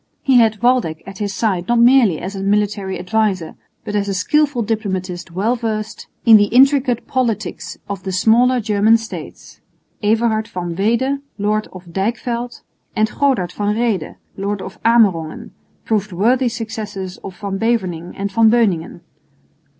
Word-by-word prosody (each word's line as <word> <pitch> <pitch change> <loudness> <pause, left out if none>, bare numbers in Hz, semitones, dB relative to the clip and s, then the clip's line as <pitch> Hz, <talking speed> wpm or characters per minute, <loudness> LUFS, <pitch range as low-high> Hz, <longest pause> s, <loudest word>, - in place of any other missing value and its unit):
He 265 -2 +4
had 220 -1 +2
Waldeck 240 -11 +1
at 195 0 -10
his 205 -1 -2
side 190 -3 -1
not 240 - +2
merely 235 -7 +5
as 190 +3 -6
a 195 - -5
military 200 -1 0
adviser, 190 -2 -1 0.3
but 210 - -4
as 200 -1 0
a 195 - -2
skilful 275 +6 +1
diplomatist 190 -5 -3
well 200 +8 0
versed 220 -2 -4 0.2
in 225 -2 +9
the 205 - +4
intricate 260 +1 +3
politics 225 -8 -2
of 200 -2 -5
the 190 0 -4
smaller 235 +7 +3
German 215 0 +3
states; 225 0 -10 0.4
Everhard 220 0 +1
van 175 -2 -5
Weede, 235 +8 +1 0.2
lord 215 +1 0
of 185 0 -11
Dijkveld, 235 +4 -3 0.3
and 215 0 +1
Godard 255 -12 +1
van 205 +2 -1
Rheede, 225 -8 -1 0.2
lord 200 +1 -2
of 195 +3 -9
Amerongen, 200 -9 +2 0.3
proved 210 -2 -1
worthy 240 +8 +2
successors 210 -5 -6
of 190 -1 -10
Van 200 -2 -4
Beverningh 185 -7 -1
and 200 0 -3
Van 225 +2 +4
Beuningen. 200 -8 +1
210 Hz, 150 wpm, -18 LUFS, 190-235 Hz, 0.4 s, in